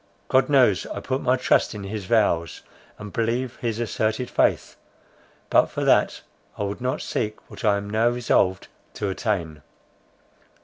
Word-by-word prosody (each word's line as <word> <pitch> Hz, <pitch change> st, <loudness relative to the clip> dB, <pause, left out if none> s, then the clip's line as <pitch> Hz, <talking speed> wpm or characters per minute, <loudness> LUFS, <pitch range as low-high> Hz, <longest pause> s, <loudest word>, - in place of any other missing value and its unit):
God 130 Hz, +1 st, +3 dB
knows, 125 Hz, -9 st, +4 dB
I -, -, -5 dB
put 130 Hz, +1 st, -2 dB
my 130 Hz, +1 st, +2 dB
trust 125 Hz, -, +2 dB
in 105 Hz, -, -6 dB
his 100 Hz, 0 st, -5 dB
vows, 90 Hz, -7 st, +1 dB, 0.3 s
and 105 Hz, -2 st, -9 dB
believe 120 Hz, +2 st, -1 dB
his 115 Hz, -2 st, -3 dB
asserted 110 Hz, +1 st, -1 dB
faith—but -, -, -1 dB
for -, -, -3 dB
that, -, -, +3 dB, 0.4 s
I -, -, -2 dB
would 100 Hz, +3 st, -4 dB
not 130 Hz, +4 st, -2 dB
seek 110 Hz, -1 st, -3 dB
what -, -, -10 dB
I 105 Hz, -2 st, +3 dB
am 100 Hz, 0 st, -5 dB
now 110 Hz, +3 st, +2 dB
resolved 115 Hz, -6 st, +1 dB, 0.3 s
to 100 Hz, -, -2 dB
attain. 90 Hz, -7 st, -2 dB
110 Hz, 150 wpm, -24 LUFS, 100-125 Hz, 0.4 s, knows